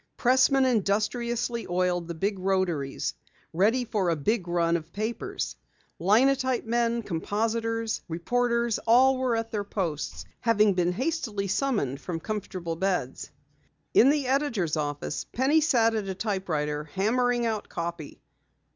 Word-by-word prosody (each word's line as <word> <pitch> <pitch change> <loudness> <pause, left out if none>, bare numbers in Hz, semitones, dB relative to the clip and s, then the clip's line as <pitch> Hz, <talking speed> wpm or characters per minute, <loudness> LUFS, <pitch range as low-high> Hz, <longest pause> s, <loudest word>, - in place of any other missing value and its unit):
Pressmen 260 +2 +4
industriously 235 +1 0
oiled 175 -1 0
the 170 - -5
big 195 +4 -1
rotaries 185 -7 -1 0.4
ready 220 +9 +2
for 200 -5 0
a 165 - +2
big 180 +5 -1
run 170 -1 +1
of 165 0 -4
papers; 220 +5 -3 0.4
linotype 255 +7 +3
men, 235 0 0
compositors, 225 +5 -1
reporters, 235 +7 0
all 255 +3 +5
were 255 -2 +1
at 225 0 -3
their 210 -3 -2
posts, 150 - -3
having 215 -3 +3
been 180 -1 +1
hastily 230 - -2
summoned 195 - -1
from 170 -3 -4
comfortable 185 -4 -4
beds. 190 +1 -2 0.6
In 255 - +7
the 290 -1 +2
editor's 250 - 0
office, 145 -1 -3
Penny 275 +6 +2
sat 235 -7 +3
at 215 -3 -2
a 190 - -3
typewriter 155 -8 -2
hammering 240 +9 +1
out 220 -2 -2
copy. 170 -3 -5
210 Hz, 130 wpm, -27 LUFS, 175-240 Hz, 0.6 s, In